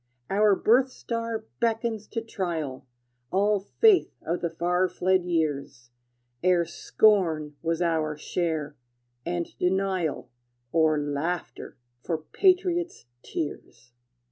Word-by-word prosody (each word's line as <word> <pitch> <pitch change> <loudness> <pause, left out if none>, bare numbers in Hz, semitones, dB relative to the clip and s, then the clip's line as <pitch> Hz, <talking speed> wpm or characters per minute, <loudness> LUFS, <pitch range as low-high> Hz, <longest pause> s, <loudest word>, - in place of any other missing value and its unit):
Our 205 0 +4
birth 250 +7 +4
star 230 -2 -4
beckons 225 -2 -1
to 230 - -3
trial 165 -12 -4 0.4
All 205 +2 +2
faith 390 - +3
of 170 +3 -1
the 170 - 0
far 180 +3 +1
fled 185 0 +1
years, 145 -7 -2 0.5
Ere 180 -1 +4
scorn 165 -3 +2
was 165 +1 0
our 155 -3 0
share, 155 -2 -2 0.5
and 175 -1 -3
denial, 185 -8 0 0.4
Or 160 -2 +3
laughter 145 +3 -3 0.2
for 165 +5 -2
patriot's 355 - +1 0.2
tears. 125 -5 -6
175 Hz, 105 wpm, -26 LUFS, 155-210 Hz, 0.5 s, Our